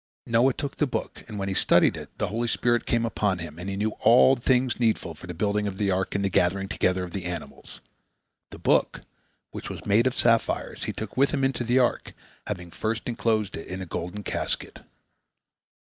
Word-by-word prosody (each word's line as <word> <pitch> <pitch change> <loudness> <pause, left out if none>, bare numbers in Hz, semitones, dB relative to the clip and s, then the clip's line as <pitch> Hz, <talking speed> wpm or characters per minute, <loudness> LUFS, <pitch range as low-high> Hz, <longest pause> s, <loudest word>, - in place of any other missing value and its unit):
Noah 120 +3 +3
took 140 -2 -4
the 150 - +2
book, - - -4
and 110 -3 -7
when 100 -1 -2
he 95 - -1
studied - - +4
it, - - -8
the - - -1
holy 115 +2 -1
spirit 120 0 +1
came 115 -1 +1
upon 105 -4 0
him, 80 -2 -8
and 90 +2 -5
he 95 - -3
knew 110 +2 0
all 125 +4 +6
things 125 0 +1
needful 110 -8 +1
for 80 - -12
the 90 - -5
building 105 +2 0
of 95 -1 -5
the 100 -2 +1
ark 95 +1 -1
and 100 0 +1
the - - +1
gathering 95 +3 +2
together 95 -3 0
of 90 - -6
the 95 -2 -5
animals. 85 -3 -7 0.7
The - - -10
book, - - +2 0.5
which - - -7
was - - -8
made 110 +5 +4
of 130 - -1
sapphires, 115 -1 +1
he - - -2
took - - -7
with 140 +1 +4
him 140 -3 -1
into 135 -2 +1
the 120 +2 +2
ark, 125 -2 +1 0.3
having 90 -4 -5
first 110 +4 -3
enclosed 110 -4 0
it 80 - -7
in 95 - -5
a 95 - -5
golden 90 +4 -5
casket. - - -3
105 Hz, 210 wpm, -26 LUFS, 95-120 Hz, 0.7 s, all